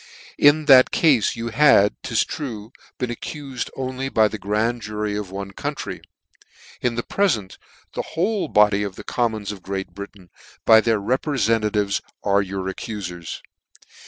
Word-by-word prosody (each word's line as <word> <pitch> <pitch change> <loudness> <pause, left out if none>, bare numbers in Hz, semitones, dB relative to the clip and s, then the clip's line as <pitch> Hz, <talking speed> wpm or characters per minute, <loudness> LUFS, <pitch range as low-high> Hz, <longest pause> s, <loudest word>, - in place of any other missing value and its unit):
In 145 +2 +5
that 130 -3 +8
cafe 145 - +3
you 115 0 -3
had 115 -5 +5
('tis - - 0
true) 115 -6 -6 0.3
been 125 -2 -2
accufed 135 +1 -6
only 130 0 -3
by 110 -4 +4
the 110 0 -6
grand 110 +4 -1
jury 105 -1 -3
of 105 -2 -4
one 100 +1 -6
county; - - -5 0.8
in 120 -2 0
the 120 - -2
prefent, 115 - -1 0.3
the - - -2 0.2
whole 200 +4 0
body 105 -1 +4
of 100 -2 -4
the - - -9
commons 110 -4 -1
of 100 -2 -9
Great 95 0 -5
Britain, 100 -3 -10 0.3
by 110 -1 +7
their 110 -1 +1
reprefentatives, 110 -4 0 0.2
are 100 0 +3
your 95 -1 -4
accuiers. 95 -4 -6
110 Hz, 150 wpm, -22 LUFS, 100-130 Hz, 0.8 s, that